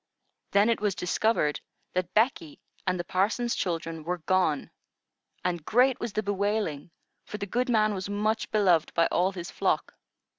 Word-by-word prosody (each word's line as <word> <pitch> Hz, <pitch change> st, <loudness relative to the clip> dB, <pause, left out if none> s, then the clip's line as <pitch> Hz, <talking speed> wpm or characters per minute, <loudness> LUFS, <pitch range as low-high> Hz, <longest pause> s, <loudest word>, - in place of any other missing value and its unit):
Then 200 Hz, +2 st, +4 dB
it 230 Hz, -, -1 dB
was 205 Hz, -3 st, +1 dB
discovered 180 Hz, -6 st, +1 dB, 0.3 s
that 185 Hz, -1 st, -1 dB
Becky 215 Hz, -, +1 dB, 0.3 s
and 185 Hz, -1 st, +1 dB
the -, -, -1 dB
parson's 205 Hz, +7 st, 0 dB
children 165 Hz, -3 st, -3 dB
were 180 Hz, +3 st, -2 dB
gone, 170 Hz, -3 st, 0 dB, 0.7 s
and 175 Hz, -3 st, -1 dB
great 250 Hz, -, +3 dB
was 235 Hz, -3 st, -4 dB
the 215 Hz, -, -1 dB
bewailing, 200 Hz, -6 st, -1 dB, 0.3 s
for 210 Hz, -, -7 dB
the 200 Hz, -, -4 dB
good 245 Hz, +6 st, -1 dB
man 215 Hz, -2 st, +3 dB
was 190 Hz, 0 st, -4 dB
much 215 Hz, +2 st, 0 dB
beloved 185 Hz, -7 st, +3 dB
by 165 Hz, -, +4 dB
all 185 Hz, +2 st, +2 dB
his 175 Hz, -1 st, -6 dB
flock. -, -, 0 dB
195 Hz, 160 wpm, -28 LUFS, 175-215 Hz, 0.7 s, Then